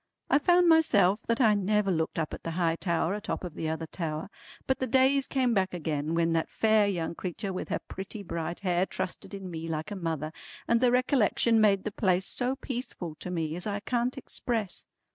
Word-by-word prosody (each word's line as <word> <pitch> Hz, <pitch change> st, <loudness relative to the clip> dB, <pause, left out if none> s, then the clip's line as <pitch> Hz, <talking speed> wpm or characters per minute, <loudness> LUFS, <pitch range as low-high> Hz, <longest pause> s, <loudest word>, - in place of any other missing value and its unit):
I 280 Hz, -, +6 dB
found 350 Hz, +3 st, +4 dB
myself 215 Hz, -, +4 dB
that 230 Hz, 0 st, +1 dB
I 220 Hz, -5 st, +5 dB
never 205 Hz, 0 st, +1 dB
looked 160 Hz, -2 st, -1 dB
up 160 Hz, -2 st, -2 dB
at -, -, -6 dB
the -, -, -4 dB
high 165 Hz, -2 st, +2 dB
tower 170 Hz, 0 st, 0 dB
atop 210 Hz, -1 st, -4 dB
of 175 Hz, -3 st, -5 dB
the 160 Hz, 0 st, -3 dB
other 160 Hz, +1 st, -3 dB
tower, 160 Hz, +2 st, -4 dB, 0.3 s
but 265 Hz, -, 0 dB
the 260 Hz, -, -1 dB
days 265 Hz, +2 st, +3 dB
came 255 Hz, -3 st, +1 dB
back 190 Hz, -3 st, +1 dB
again 155 Hz, -1 st, -2 dB
when 165 Hz, 0 st, +2 dB
that 165 Hz, -1 st, 0 dB
fair 220 Hz, -2 st, +3 dB
young 170 Hz, -4 st, -2 dB
creetur 185 Hz, +3 st, -4 dB
with 185 Hz, -, -5 dB
her -, -, 0 dB
pretty 195 Hz, +2 st, -7 dB
bright 170 Hz, 0 st, -4 dB
hair 180 Hz, -1 st, +1 dB
trusted 190 Hz, -, -5 dB
in 190 Hz, -2 st, -7 dB
me 165 Hz, 0 st, -5 dB
like 160 Hz, +3 st, -3 dB
a -, -, -3 dB
mother, 160 Hz, -4 st, -3 dB, 0.4 s
and 235 Hz, 0 st, +3 dB
the 250 Hz, -, +5 dB
recollection 245 Hz, -3 st, +3 dB
made 200 Hz, -3 st, +4 dB
the 215 Hz, -, -3 dB
place 190 Hz, -3 st, +1 dB
so 250 Hz, +2 st, 0 dB
peaceful 245 Hz, -, -5 dB
to -, -, -6 dB
me 165 Hz, -3 st, -2 dB
as 180 Hz, +4 st, -3 dB
I 205 Hz, -1 st, -2 dB
can't 245 Hz, +3 st, -1 dB
express. 225 Hz, -6 st, -3 dB
195 Hz, 210 wpm, -29 LUFS, 165-230 Hz, 0.4 s, I